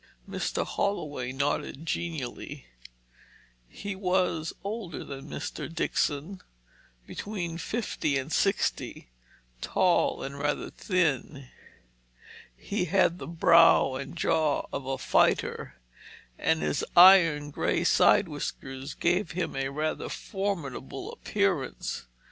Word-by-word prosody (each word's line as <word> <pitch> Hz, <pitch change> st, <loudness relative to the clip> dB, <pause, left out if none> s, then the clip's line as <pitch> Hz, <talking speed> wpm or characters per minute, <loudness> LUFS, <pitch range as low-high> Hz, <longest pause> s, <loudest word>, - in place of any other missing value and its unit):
Mr. -, -, -2 dB
Holloway 145 Hz, -10 st, -2 dB
nodded 140 Hz, +2 st, -2 dB
genially. 155 Hz, -, -4 dB, 1.0 s
He 200 Hz, -1 st, -6 dB
was 180 Hz, -4 st, 0 dB
older 200 Hz, -4 st, -5 dB
than 135 Hz, -1 st, -8 dB
Mr. -, -, -5 dB
Dixon, 165 Hz, +2 st, -1 dB, 0.6 s
between 175 Hz, -, -5 dB
fifty 165 Hz, -8 st, -1 dB
and 135 Hz, +4 st, -4 dB
sixty, 195 Hz, -, 0 dB, 0.5 s
tall 180 Hz, -2 st, +2 dB
and 140 Hz, +1 st, -6 dB
rather 145 Hz, +1 st, -1 dB
thin. 150 Hz, -7 st, -1 dB, 1.1 s
He 200 Hz, -3 st, -2 dB
had 180 Hz, 0 st, +2 dB
the -, -, -7 dB
brow 165 Hz, -4 st, +5 dB
and 135 Hz, +5 st, -6 dB
jaw 155 Hz, -3 st, +1 dB
of 135 Hz, -, -4 dB
a 135 Hz, 0 st, -1 dB
fighter, -, -, +1 dB, 0.6 s
and 160 Hz, 0 st, +1 dB
his -, -, 0 dB
iron 165 Hz, -5 st, +7 dB
grey -, -, 0 dB
side -, -, +5 dB
whiskers 135 Hz, +2 st, -6 dB
gave 175 Hz, -1 st, 0 dB
him 180 Hz, 0 st, -2 dB
a 135 Hz, 0 st, -1 dB
rather 155 Hz, +3 st, -2 dB
formidable 170 Hz, -, -4 dB
appearance. 190 Hz, -, -1 dB
160 Hz, 105 wpm, -28 LUFS, 140-185 Hz, 1.1 s, iron